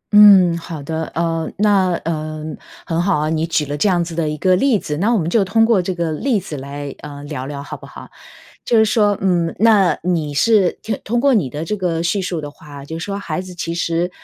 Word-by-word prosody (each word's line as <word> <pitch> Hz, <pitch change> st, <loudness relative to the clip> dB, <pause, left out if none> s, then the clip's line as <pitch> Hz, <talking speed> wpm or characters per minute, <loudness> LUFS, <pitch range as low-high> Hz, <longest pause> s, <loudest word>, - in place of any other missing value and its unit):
嗯， 195 Hz, -5 st, +8 dB
好 165 Hz, -3 st, -7 dB
的。 160 Hz, +2 st, -3 dB
呃， 165 Hz, -1 st, -1 dB
那 200 Hz, -3 st, +3 dB
呃， 155 Hz, -1 st, -3 dB, 0.4 s
很 165 Hz, 0 st, -1 dB
好 190 Hz, 0 st, +1 dB
啊， 150 Hz, +1 st, -1 dB
你 160 Hz, 0 st, 0 dB
举 160 Hz, -2 st, 0 dB
了 145 Hz, +1 st, -4 dB
这 150 Hz, +8 st, +2 dB
样 175 Hz, -2 st, +2 dB
子 170 Hz, 0 st, -7 dB
的 160 Hz, -2 st, -1 dB
一 150 Hz, -, -4 dB
个 185 Hz, +3 st, +3 dB
例 245 Hz, +4 st, +3 dB
子， 150 Hz, -6 st, -4 dB
那 205 Hz, +8 st, +1 dB
我 240 Hz, -, +3 dB
们 165 Hz, -5 st, -1 dB
就 200 Hz, +4 st, +2 dB
通 225 Hz, +4 st, +3 dB
过 225 Hz, -4 st, +3 dB
这 180 Hz, +1 st, -3 dB
个 170 Hz, -2 st, -1 dB
例 225 Hz, -, 0 dB
子 170 Hz, -5 st, -7 dB
来， 140 Hz, +1 st, -6 dB
呃， 145 Hz, -1 st, -9 dB
聊 145 Hz, -3 st, -5 dB
聊 140 Hz, -1 st, -6 dB
好 -, -, -7 dB
不 -, -, -12 dB
好？ -, -, -11 dB, 0.6 s
就 235 Hz, -, +2 dB
是 220 Hz, -, +6 dB
说， 210 Hz, -2 st, +2 dB
嗯， 175 Hz, -3 st, +1 dB
那 210 Hz, -5 st, +4 dB
你 165 Hz, -5 st, -1 dB
是 200 Hz, +2 st, +3 dB
听 215 Hz, -2 st, -3 dB
通 235 Hz, +3 st, 0 dB
过 280 Hz, +2 st, +3 dB
你 195 Hz, -, +2 dB
的 150 Hz, +5 st, -5 dB
这 210 Hz, +6 st, -2 dB
个 175 Hz, -4 st, -1 dB
叙 175 Hz, +4 st, 0 dB
述 180 Hz, -3 st, -3 dB
的 145 Hz, -1 st, -7 dB
话， 145 Hz, -2 st, -12 dB
就 160 Hz, +3 st, -6 dB
说 200 Hz, +4 st, -4 dB
孩 160 Hz, -4 st, -3 dB
子 185 Hz, -1 st, -9 dB
其 165 Hz, -1 st, -4 dB
实 170 Hz, +1 st, -1 dB
170 Hz, 255 characters per minute, -19 LUFS, 155-200 Hz, 0.6 s, 嗯